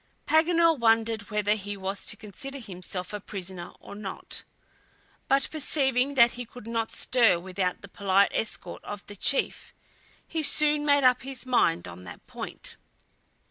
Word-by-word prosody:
Paganel 330 -1 +4
wondered 225 -2 +2
whether 210 -1 +1
he 205 -1 -5
was 195 +1 -3
to 215 - -2
consider 270 +7 -7
himself 185 -4 -6
a 210 - -3
prisoner 190 -3 -6
or - - -11
not. 200 -1 -4 0.9
But 275 0 +3
perceiving 280 -3 +1
that 235 -2 +7
he 245 - -6
could 240 0 -12
not 230 -1 -1
stir 230 -8 +3
without 185 0 -2
the - - -8
polite 200 0 +2
escort 225 - -3
of 205 -1 -7
the 205 - -10
chief, 275 +7 0 0.5
he 325 - -2
soon 300 0 +2
made 285 -1 +4
up 250 -1 +5
his 265 -1 0
mind 230 - +2
on 90 +1 -10
that 85 - -11
point. - - -7
225 Hz, 155 wpm, -27 LUFS, 195-270 Hz, 0.9 s, that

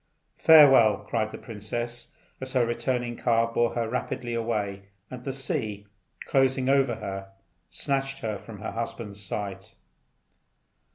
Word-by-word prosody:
"Farewell!" 135 -10 +7
cried 110 -2 0
the - - -8
princess, 120 +2 -6 0.3
as 130 0 -6
her 125 -3 +3
returning 120 0 -1
car 115 -1 +1
bore 120 0 +1
her 115 -1 0
rapidly 120 0 -3
away, 105 -4 -2 0.3
and 125 -1 -7
the 135 - -3
sea, 130 - -3 0.4
closing 135 -1 +2
over 135 -3 +3
her, 95 -1 -6 0.4
snatched 135 0 -2
her 105 -3 -3
from 105 -4 -11
her - - -4
husband's 110 -3 -5
sight. 95 0 -5
115 Hz, 130 wpm, -27 LUFS, 105-130 Hz, 0.4 s, Farewell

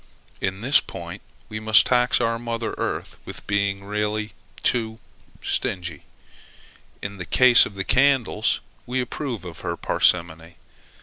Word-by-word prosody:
In 95 +1 -2
this 135 +5 +4
point, 85 +3 -8 0.3
we 110 -1 -5
must 110 -2 +5
tax 125 -1 +3
our 115 -1 0
mother 115 -1 -3
earth - - -3
with - - -10
being 100 -1 0
really 105 0 -2 0.3
too 110 -2 0 0.5
stingy. 85 -5 -2 1.0
In 100 0 -5
the 90 - -5
case 125 +8 +6
of 100 - -13
the 95 - -2
candles, 130 -5 +2 0.3
we 125 +1 -1
approve 125 -4 -4
of 85 -2 -8
her - - -4
parsimony. 85 -1 +1
105 Hz, 135 wpm, -23 LUFS, 95-120 Hz, 1.0 s, case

